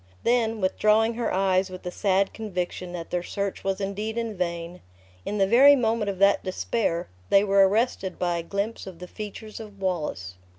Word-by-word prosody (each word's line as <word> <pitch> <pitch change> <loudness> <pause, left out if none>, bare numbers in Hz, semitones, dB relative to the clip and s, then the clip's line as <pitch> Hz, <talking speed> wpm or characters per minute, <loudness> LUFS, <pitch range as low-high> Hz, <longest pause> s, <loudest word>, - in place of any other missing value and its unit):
Then 225 -2 +1
withdrawing 215 +4 +3
her 235 0 -2
eyes 190 0 +2
with 185 -1 -10
a 180 - -3
sad 195 +1 +1
conviction 180 -4 -4
that 170 -2 -7
their 180 - 0
search 200 +2 -4
was 195 0 -1
indeed 205 +3 -3
in 230 -2 -2
vain; 170 -1 -4 0.5
in 210 - -2
the 195 - +4
very 265 +8 +7
moment 225 -4 0
of 195 - -3
that 200 +1 +4
despair, 185 -2 -1 0.2
they 195 - +5
were 195 -1 +5
arrested 210 -3 0
by 175 -1 0
a - - -2
glimpse 200 +6 -4
of 185 -3 -9
the 180 +1 -9
features 215 +2 -8
of 210 -3 -11
Wallace. 150 - -3
195 Hz, 185 wpm, -25 LUFS, 180-220 Hz, 0.5 s, very